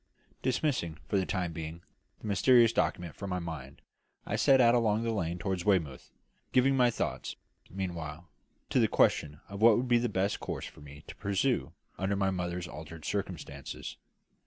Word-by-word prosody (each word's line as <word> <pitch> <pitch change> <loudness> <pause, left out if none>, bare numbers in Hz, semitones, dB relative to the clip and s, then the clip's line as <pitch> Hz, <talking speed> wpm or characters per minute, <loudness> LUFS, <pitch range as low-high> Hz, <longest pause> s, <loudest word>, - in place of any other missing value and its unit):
Dismissing, 125 - 0
for 100 - +2
the 95 - -1
time 90 -4 -1
being, 80 +1 -6 0.4
the - - -10
mysterious 115 +3 +5
document 85 -3 0
from 100 - -6
my 90 - -1
mind, 80 -6 -7 0.4
I - - -2
set 135 -1 +5
out 120 -2 +6
along 115 -2 +2
the 115 - 0
lane 85 -4 -1
toward 95 0 -2
Weymouth, 80 -10 0 0.4
giving 135 +2 +4
my 125 -2 +5
thoughts, 120 - -3 0.3
meanwhile, 85 -3 -5 0.4
to - - +4
the - - +5
question 75 0 +2
of 100 +1 -7
what 115 -1 +7
would 125 +2 0
be 120 -1 +4
the 120 0 0
best 100 +1 0
course - - -4
for - - -11
me 75 0 -12
to - - -10
pursue 100 - 0 0.3
under 95 +2 0
my 95 -1 +1
mother's 90 -1 -3
altered 80 0 -9
circumstances. 85 -9 -5
95 Hz, 175 wpm, -31 LUFS, 80-115 Hz, 0.4 s, what